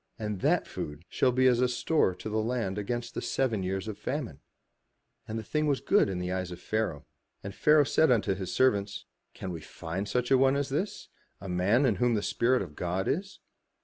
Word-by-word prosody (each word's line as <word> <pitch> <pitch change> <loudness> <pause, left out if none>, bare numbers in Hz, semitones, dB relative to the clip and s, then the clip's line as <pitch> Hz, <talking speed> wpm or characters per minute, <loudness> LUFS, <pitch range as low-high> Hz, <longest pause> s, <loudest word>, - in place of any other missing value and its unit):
And 105 -3 -3
that - - +2
food 75 +3 -7
shall 130 - +2
be 130 +1 +2
as 125 -1 +4
a 125 - +4
store 125 - +1
to - - -8
the 110 0 0
land 110 -4 -2
against 120 +3 -3
the - - -3
seven 115 -7 0
years 95 +2 -3
of 105 -1 -6
famine." 125 - -4 0.9
And 110 - -4
the 110 - -4
thing 150 +7 0
was 140 -2 +1
good 200 - +3
in 95 - -3
the 90 0 -3
eyes 95 -1 -2
of 90 -1 -8
Pharaoh. 110 -7 -2 0.4
And 100 - -6
Pharaoh 150 +5 +5
said 160 +2 +3
unto 115 -5 +3
his 95 -1 -5
servants, 100 -6 +1 0.3
"Can 95 - -5
we 85 -2 -6
find 90 +6 -5
such 125 +4 -1
a 135 - +6
one 135 +1 +4
as 140 0 -1
this, 165 +10 -3 0.3
a 100 - -8
man 95 +9 +2
in 110 -7 +2
whom 120 +2 +2
the 105 - -1
Spirit 125 -1 +2
of 75 -5 -11
God 90 +2 -2
is? 195 +5 -2
110 Hz, 215 wpm, -29 LUFS, 95-130 Hz, 0.9 s, a